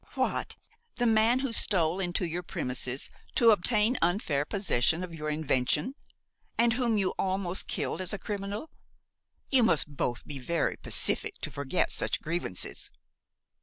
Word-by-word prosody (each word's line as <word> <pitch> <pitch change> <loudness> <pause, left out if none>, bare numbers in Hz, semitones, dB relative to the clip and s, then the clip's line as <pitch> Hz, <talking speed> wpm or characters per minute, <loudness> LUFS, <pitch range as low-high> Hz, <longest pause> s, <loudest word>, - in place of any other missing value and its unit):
"What! - - -1 0.4
the 245 - 0
man 225 +3 +4
who 270 -4 -2
stole 180 -5 +2
into 180 0 -1
your 170 +1 -3
premises 130 -7 -2 0.2
to 230 -2 +6
obtain 215 +4 +2
unfair 165 -5 +1
possession 170 -4 +1
of 175 -2 -7
your 155 -1 -4
invention, 150 - +1 0.6
and 235 0 +4
whom 240 -3 +1
you 190 -2 +1
almost 190 -1 -1
killed - - -2
as 185 - 0
a 205 - +1
criminal! 205 - -5 0.8
You 265 -2 +5
must 155 -9 +3
both 120 -2 -2
be 145 -2 -5
very 170 +6 0
pacific 435 -2 +1
to 155 - -3
forget 140 +5 0
such - - 0
grievances!" 160 - -2
180 Hz, 145 wpm, -29 LUFS, 155-220 Hz, 0.8 s, to